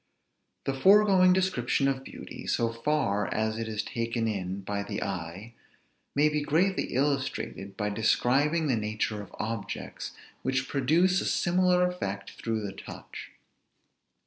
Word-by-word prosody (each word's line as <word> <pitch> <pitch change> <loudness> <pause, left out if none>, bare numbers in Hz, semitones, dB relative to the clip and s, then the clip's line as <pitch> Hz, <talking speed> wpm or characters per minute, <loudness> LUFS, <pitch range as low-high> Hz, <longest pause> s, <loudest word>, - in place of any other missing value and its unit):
The 135 - 0
foregoing 190 +4 +6
description 180 -8 +2
of 135 -1 -1
beauty, - - -9
so 115 -1 +1
far 115 -5 0
as 110 +1 0
it 115 - -3
is 110 -1 -2
taken 115 0 -2
in 95 -2 -3
by 100 +1 -3
the 100 - -3
eye, 95 +4 -5 0.6
may 145 +2 +5
he 150 0 0
greatly 170 +7 +2
illustrated 130 -8 -1
by 105 -1 -1
describing 135 +9 +2
the 135 -5 +2
nature 105 0 -2
of 100 - -11
objects, 110 0 -4 0.3
which 130 0 0
produce 165 +7 +3
a - - -3
similar 180 0 +3
effect 100 - -4
through 110 -2 -3
the 95 - -5
touch. - - -9
120 Hz, 140 wpm, -28 LUFS, 105-150 Hz, 0.6 s, foregoing